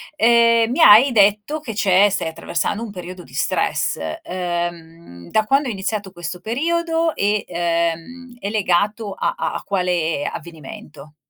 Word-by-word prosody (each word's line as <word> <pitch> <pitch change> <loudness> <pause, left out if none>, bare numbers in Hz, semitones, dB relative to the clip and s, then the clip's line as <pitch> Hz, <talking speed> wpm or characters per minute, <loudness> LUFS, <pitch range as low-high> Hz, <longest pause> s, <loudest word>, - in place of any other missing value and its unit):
Ehm, 230 -2 +4
mi 320 - 0
hai 235 +4 +8
detto 210 +7 +2
che 235 -7 -7
c'è 200 0 +4
stai 195 -4 -2
attraversando 170 +7 -3
un 225 - -7
periodo 180 -1 -9
di - - -18
stress, - - -1 0.2
ehm, 170 - -6
da 215 - +2
quando 275 +3 +2
è - - -2
iniziato 200 0 -4
questo 175 0 -7
periodo 330 - -1
e, 205 +1 0
ehm, 170 +9 -3
è 200 - -4
legato 205 +1 0
a - - -2
a - - -2
a - - -5
quale 175 -6 -1
avvenimento? 150 -2 -11
200 Hz, 150 wpm, -20 LUFS, 175-230 Hz, 0.2 s, hai